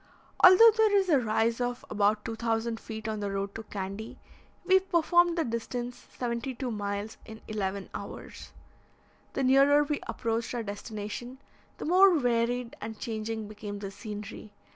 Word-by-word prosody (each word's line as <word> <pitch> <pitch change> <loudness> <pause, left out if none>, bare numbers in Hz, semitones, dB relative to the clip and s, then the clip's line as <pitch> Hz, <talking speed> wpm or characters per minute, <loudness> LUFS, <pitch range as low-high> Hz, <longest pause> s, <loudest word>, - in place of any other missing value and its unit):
Although 375 +5 +10
there 435 -2 +4
is 385 -2 +1
a 295 -5 +5
rise 230 +1 0
of 245 0 -2
about 210 +1 +1
2,000 225 0 -2
feet 220 -1 -7
on 215 -1 -2
the 205 -1 -2
road 195 0 -3
to 225 - -6
Candy, 200 +1 -6 0.5
we 380 +1 +6
performed 345 -1 +3
the 330 - +2
distance, 240 +1 -5
seventy 245 +1 -3
two 250 0 -3
miles, 205 0 -4
in 220 -1 -10
eleven 200 -2 -3
hours. - - -8 0.8
The 270 - -1
nearer 275 +3 +5
we 295 -1 -2
approached 230 +1 -2
our 235 - -2
destination, 210 +4 -6 0.4
the - - -6
more 365 +1 +6
varied 245 -1 0
and 220 -1 -6
changing 220 -2 -4
became 205 -1 -7
the 200 -1 -6
scenery. 210 0 -8
230 Hz, 155 wpm, -29 LUFS, 210-265 Hz, 0.8 s, Although